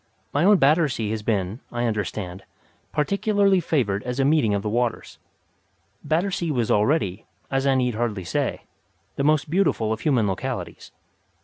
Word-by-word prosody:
My 145 - +2
own 205 0 +6
Battersea 140 - +2
has 110 -1 -3
been, 105 0 -1
I 120 0 -1
understand, 100 -4 -3 0.5
particularly 200 +4 +2
favoured 115 - 0
as 125 +3 -4
a 135 - +3
meeting 140 -8 +3
of 100 - -2
the - - -3
waters. 120 +1 -2 0.8
Battersea 175 +1 0
was 120 -6 0
already, 105 - +1 0.2
as 135 0 +1
I 135 - +4
need 125 -2 +1
hardly 110 -4 -2
say, 85 - -2 0.5
the 140 - -1
most 150 0 +2
beautiful 155 - +1
of 110 - -5
human 125 -6 +2
localities. 95 - -5
125 Hz, 150 wpm, -24 LUFS, 105-155 Hz, 0.8 s, own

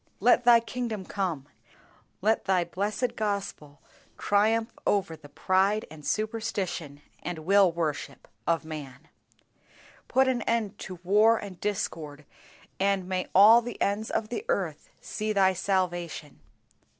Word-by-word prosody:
Let 245 +3 +4
Thy 240 -1 +8
kingdom 230 -4 -4
come, 175 -10 -3 0.8
let 220 +2 +2
Thy 185 -2 +2
blessed 215 +7 -2
Gospel 200 -9 -4 0.3
triumph 225 +3 +2 0.2
over 195 -5 +1
the 150 -2 -15
pride 190 +7 +1
and 155 -1 -12
superstition 195 -9 -3 0.2
and 175 -1 -4
will 195 -1 +5
worship 155 -4 -4 0.2
of 165 -1 +1
man. 150 -2 -9 1.0
Put 265 0 +3
an 255 -2 +1
end 220 -3 -1
to 185 - -7
war 210 +5 +4
and 195 -4 -9
discord, 155 -7 -4 0.5
and 195 -1 +1
may 185 -1 -2
all 215 +5 +8
the 240 0 -7
ends 205 +2 -1
of 215 -1 -2
the 245 - -4
earth - - -2
see 215 0 -3
Thy 190 -2 +4
salvation. 175 -5 -2
195 Hz, 130 wpm, -27 LUFS, 170-220 Hz, 1.0 s, Thy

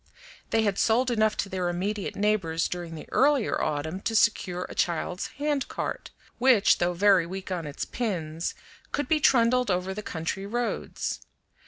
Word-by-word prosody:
They 225 0 +2
had 200 -2 0
sold 245 +3 +3
enough 220 -2 +2
to - - -1
their 185 -2 -2
immediate 195 +4 -2
neighbors 195 -6 +1
during 175 -2 -5
the 155 - -9
earlier 275 -4 +3
autumn 155 +4 -2
to 225 +3 -2
secure 185 -5 +2
a - - -9
child's 175 +1 -1
handcart, 290 -1 -2 0.3
which, 245 -5 +5
though 175 0 +1
very 190 -1 +4
weak 190 +1 -6
on 170 -4 -3
its 145 - -4
pins, 170 -9 -3 0.4
could 290 - -1
be 315 -1 +3
trundled 250 -4 +4
over 185 +1 0
the 210 - -5
country 180 +2 -4
roads. 240 +3 -2
195 Hz, 160 wpm, -27 LUFS, 175-230 Hz, 0.4 s, which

